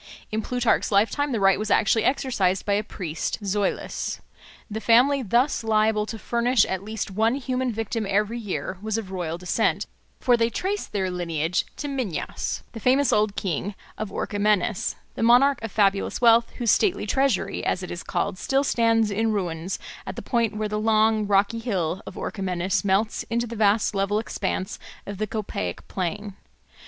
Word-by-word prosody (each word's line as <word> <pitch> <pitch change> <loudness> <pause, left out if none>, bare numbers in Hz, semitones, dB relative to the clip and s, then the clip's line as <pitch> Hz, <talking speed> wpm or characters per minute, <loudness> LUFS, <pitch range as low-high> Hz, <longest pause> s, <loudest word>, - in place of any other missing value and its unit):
In 220 +1 -1
Plutarch's 245 0 +1
lifetime 225 +8 +2
the 230 - 0
right 195 0 +4
was 215 0 -3
actually 220 +1 +3
exercised 200 -9 +1
by 205 - +1
a 205 +1 +1
priest 170 -6 -4
Zoilus. 200 0 -2 0.5
The 220 0 -5
family 255 +5 +4
thus 240 +4 +1
liable 215 -1 +2
to 225 - -5
furnish 235 +1 +2
at 190 -1 -3
least 215 -1 -4
one 220 +5 +2
human 255 -2 -1
victim 225 -1 -3
every 210 +4 +1
year 190 -3 -4
was 215 0 -2
of 205 -4 -5
royal 170 -3 -3
descent, 180 0 0 0.3
for 245 - +4
they 230 -1 +2
traced 390 - -3
their 190 -3 -1
lineage 170 -2 -1
to 290 - -5
Minyas, 255 - -3
the 225 - -8
famous 260 +3 +3
old 210 -1 +2
king 190 +2 -2 0.2
of 215 -1 -4
Orchomenus, 205 -1 0 0.2
the - - -6
monarch 245 +4 +5
of 225 -2 -5
fabulous 200 -2 +1
wealth, 230 -1 +5
whose 235 -3 +2
stately 385 - +2
treasury, 225 -4 0
as 185 - -1
it 180 - -6
is 175 - -5
called, 185 - -2
still 275 +1 +1
stands 230 -4 +2
in 220 +2 +1
ruins 180 -3 -2 0.3
at - - -5
the - - -7
point 230 -4 0
where 215 0 -1
the 210 0 -2
long 215 -1 +3
rocky 200 +3 +2
hill 190 -6 -2
of - - -8
Orchomenus 185 -1 -1
melts 200 +3 +1
into 235 +1 0
the 230 0 -7
vast 210 0 +2
level 195 +1 +1
expanse 190 -3 -3 0.3
of 200 -1 -7
the 215 - -1
Copaic 190 - -4
plain. 190 +2 -4
215 Hz, 175 wpm, -25 LUFS, 195-230 Hz, 0.5 s, monarch